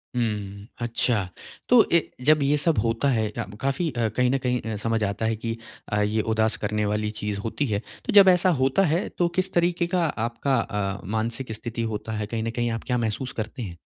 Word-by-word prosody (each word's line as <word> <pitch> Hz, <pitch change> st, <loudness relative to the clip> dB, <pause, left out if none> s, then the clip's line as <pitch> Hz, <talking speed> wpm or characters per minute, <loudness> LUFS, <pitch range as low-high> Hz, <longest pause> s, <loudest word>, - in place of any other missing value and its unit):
हुँ, 105 Hz, -4 st, -2 dB
अच्छा। 115 Hz, -4 st, +1 dB, 0.4 s
तो 245 Hz, -2 st, +8 dB
ए 170 Hz, -, +6 dB, 0.2 s
जब 155 Hz, 0 st, +5 dB
ये 145 Hz, +2 st, +3 dB
सब 160 Hz, +1 st, +1 dB
होता 115 Hz, +5 st, +1 dB
है 110 Hz, -4 st, +1 dB
अ, -, -, -4 dB, 0.2 s
काफ़ी 135 Hz, +5 st, 0 dB
अ, 115 Hz, -3 st, 0 dB
कहीं 125 Hz, 0 st, +3 dB
न 135 Hz, -, +2 dB
कहीं 125 Hz, 0 st, +1 dB
अ, -, -, -3 dB
समझ 115 Hz, -1 st, +1 dB
आता 100 Hz, +2 st, -1 dB
है 110 Hz, 0 st, +1 dB
कि 115 Hz, +1 st, -4 dB, 0.3 s
अ, 105 Hz, 0 st, +1 dB
ये 105 Hz, +1 st, +1 dB
उदास 110 Hz, 0 st, +2 dB
करने 105 Hz, 0 st, -1 dB
वाली 105 Hz, +1 st, 0 dB
चीज़ 105 Hz, -1 st, -2 dB
होती 115 Hz, +7 st, -2 dB
है। 105 Hz, -3 st, 0 dB, 0.3 s
तो -, -, -1 dB
जब 200 Hz, -2 st, +9 dB
ऐसा 180 Hz, 0 st, +4 dB
होता 135 Hz, +9 st, +3 dB
है 165 Hz, +4 st, +1 dB
तो 175 Hz, -, +3 dB
किस 185 Hz, 0 st, +1 dB
तरीके 175 Hz, 0 st, +2 dB
का 175 Hz, -1 st, +1 dB
आपका 120 Hz, 0 st, -1 dB
अ, 100 Hz, -1 st, -2 dB
मानसिक 115 Hz, +4 st, -2 dB
स्थिति 115 Hz, +1 st, -5 dB
होता 110 Hz, +1 st, -5 dB
है? 105 Hz, -, -2 dB
कहीं 110 Hz, 0 st, -3 dB
न 115 Hz, -, -1 dB
कहीं 120 Hz, 0 st, -1 dB
आप 115 Hz, -, -4 dB
क्या 125 Hz, -1 st, +1 dB
महसूस 115 Hz, +3 st, -2 dB
करते 115 Hz, +4 st, -7 dB
हैं? 90 Hz, -6 st, -6 dB
115 Hz, 220 wpm, -25 LUFS, 105-140 Hz, 0.4 s, जब